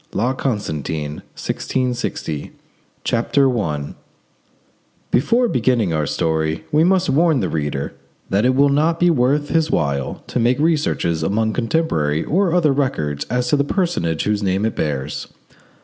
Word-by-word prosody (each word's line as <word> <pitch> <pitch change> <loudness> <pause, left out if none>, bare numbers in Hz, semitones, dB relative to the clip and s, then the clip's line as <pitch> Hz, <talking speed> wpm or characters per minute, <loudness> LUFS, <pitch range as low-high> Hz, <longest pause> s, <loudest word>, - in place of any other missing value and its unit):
*LA 120 +5 +1
CONSTANTIN—1660* 80 - -3 0.5
CHAPTER 125 +1 +2
I 75 -7 -3 1.2
Before 235 - +3
beginning 120 - +1
our 75 -2 0
story, 80 +1 -1
we 150 +2 +4
must 185 +1 +3
warn 160 0 +3
the - - -1
reader 75 -3 -2 0.4
that 100 +2 +2
it 130 +1 +3
will 140 +1 +4
not 155 +4 +2
be 175 0 +4
worth 145 +1 +1
his 160 -1 +2
while 70 - -1
to - - -2
make 120 +2 +2
researches 150 - +1
among 110 +6 0
contemporary 110 - 0
or 185 +2 +1
other 160 -5 +3
records 75 - -1
as 125 +1 -1
to - - +4
the 140 - +2
personage 145 - -1
whose 105 0 0
name 95 +1 0
it 110 - -1
bears. 75 -1 -3
120 Hz, 140 wpm, -20 LUFS, -, 1.2 s, we